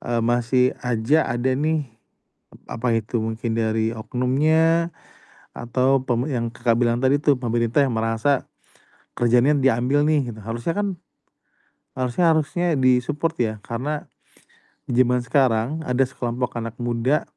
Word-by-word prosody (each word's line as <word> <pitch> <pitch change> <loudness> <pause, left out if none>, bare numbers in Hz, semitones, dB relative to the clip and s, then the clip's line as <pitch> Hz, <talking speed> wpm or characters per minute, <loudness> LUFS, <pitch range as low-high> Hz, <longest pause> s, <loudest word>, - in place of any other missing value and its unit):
eee, 120 -1 -1
masih 120 +2 +2 0.2
aja 125 +6 +1
ada 120 +2 0
nih, 155 +2 0 0.7
ep - - -17 0.2
apa 125 - 0
itu, 115 +1 -2
mungkin 110 +1 -3
dari 110 0 0
oknumnya 155 +9 +1 0.7
atau 130 +2 +1
pem 125 +1 -1
yang 120 -5 -2
Kakak 120 0 0
bilang 120 0 +2
tadi 135 +3 +2
tuh, 145 -4 +3
pemerintah 120 +1 -1
yang 120 - -2
merasa 115 +5 0 0.7
kerjaannya 120 +5 +3
diambil 135 +3 +2
nih 155 0 +3 0.2
gitu. - - -13
Harusnya 115 +8 -3
kan, 205 0 -1 1.1
harusnya 130 +7 0
harusnya 160 +3 0
di-support 130 +6 +1
ya, 110 -1 -2
karena 140 +6 -4 0.9
zaman 125 0 +2
sekarang 130 +2 +1
ada 125 +1 +2
sekelompok 125 -1 -3
anak 115 0 -6
muda 120 +5 0
125 Hz, 130 wpm, -22 LUFS, 115-145 Hz, 1.1 s, tuh